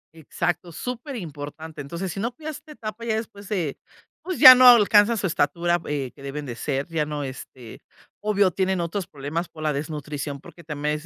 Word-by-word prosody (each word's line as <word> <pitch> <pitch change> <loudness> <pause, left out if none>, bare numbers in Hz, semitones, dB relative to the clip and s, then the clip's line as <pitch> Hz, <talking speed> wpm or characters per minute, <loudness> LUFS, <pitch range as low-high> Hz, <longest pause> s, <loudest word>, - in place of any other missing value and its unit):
Exacto, 170 +2 -3
superimportante, 160 - -7
entonces, 170 +6 -5
si 195 - -6
no 235 +4 -3
cuidas 310 -1 -6
esta 305 +1 -15
etapa, 220 -2 -7
ya 225 -2 0
después 205 -3 -6
se, 175 -9 -2 0.4
pues, 370 -1 -4
ya 255 - +12
no 255 0 +7
alcanza 220 -1 +6
su 200 - -2
estatura, 170 +1 +1
eh, 140 -4 -3
que 140 - -16
deben 140 +2 -6
de 120 -3 -6
ser, 140 +3 -2
ya 165 -2 -1
no, 150 -1 -4
este, 130 -3 -9 0.4
obvio, 205 -2 +2
tienen 190 +1 0
otros 170 +2 -3
problemas 150 +5 -4
por 155 - -10
la 150 -2 +1
desnutrición, 145 -1 -5
porque 170 - -14
también 150 -1 -2
es 155 - -12
170 Hz, 190 wpm, -24 LUFS, 145-210 Hz, 0.4 s, ya